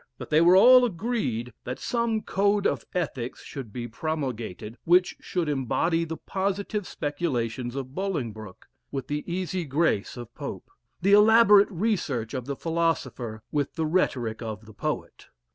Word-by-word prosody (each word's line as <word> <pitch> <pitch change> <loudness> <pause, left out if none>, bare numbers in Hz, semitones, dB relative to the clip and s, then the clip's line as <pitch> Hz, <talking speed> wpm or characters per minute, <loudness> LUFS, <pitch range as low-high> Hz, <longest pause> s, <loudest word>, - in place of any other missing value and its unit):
But - - -9
they 155 +1 +5
were 175 +2 +7
all 250 +6 +8
agreed 170 - -2
that 125 +1 -4
some 235 -2 -1
code 200 +1 +1
of - - 0
ethics 135 -8 -3
should 130 -6 -8
be 120 +2 -5
promulgated, 120 - -4
which 180 +2 +4
should 175 -3 -2
embody 155 +5 0
the 160 0 -5
positive 200 +1 -2
speculations 125 -6 -2
of 130 -1 -5
Bolingbroke, 115 - -4 0.2
with 135 -2 -4
the 150 0 -3
easy 185 0 -2
grace 140 -7 0
of 120 -1 -9
Pope - - -7 0.3
the 200 +3 +4
elaborate 210 -1 +7
research 165 - -1
of 130 -3 -3
the 140 +1 -3
philosopher 160 -9 -2
with 145 -2 -1
the 160 - -1
rhetoric 125 -10 0
of 110 -1 -6
the 110 - -13
poet. - - -4
155 Hz, 150 wpm, -26 LUFS, 120-190 Hz, 0.3 s, all